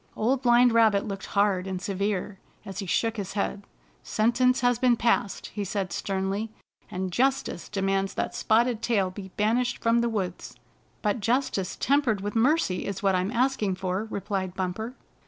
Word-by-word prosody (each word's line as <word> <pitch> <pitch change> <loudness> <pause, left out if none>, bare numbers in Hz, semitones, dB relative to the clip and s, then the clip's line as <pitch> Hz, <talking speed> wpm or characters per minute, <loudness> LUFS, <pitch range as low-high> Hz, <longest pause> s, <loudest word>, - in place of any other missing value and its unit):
Old 250 +4 +1
Blind 240 -1 +5
Rabbit 220 -3 +4
looked 195 -2 -5
hard 200 -2 +1
and 190 -1 -3
severe, 195 0 -2 0.3
as 195 -1 -6
he 195 - -4
shook 225 +5 0
his 195 -2 -4
head. 200 0 -2 0.3
" - - -35 0.2
Sentence 250 +4 +3
has 245 -2 +2
been 245 -2 +4
passed," 230 -4 0
he 205 - -3
said 195 -1 -3
sternly, 195 +3 -2 0.2
" - - -38
and 185 0 -3
justice 265 -2 0
demands 195 -1 -1
that - - -2
Spotted 230 +1 +2
Tail 205 -6 +1
be 190 0 -8
banished 235 +4 +1
from 230 +1 +2
the 235 0 +1
woods." 190 -5 -4 0.2
" - - -37
But 210 +2 +1
justice 225 -4 0
tempered 270 -7 +2
with 205 +2 -4
mercy 245 - +2
is 200 +2 -4
what 195 -1 +3
I'm 185 +1 +1
asking 240 -5 +1
for," 185 +2 -2
replied 195 -3 -3
Bumper. 195 +7 -3
210 Hz, 175 wpm, -26 LUFS, 195-235 Hz, 0.3 s, Blind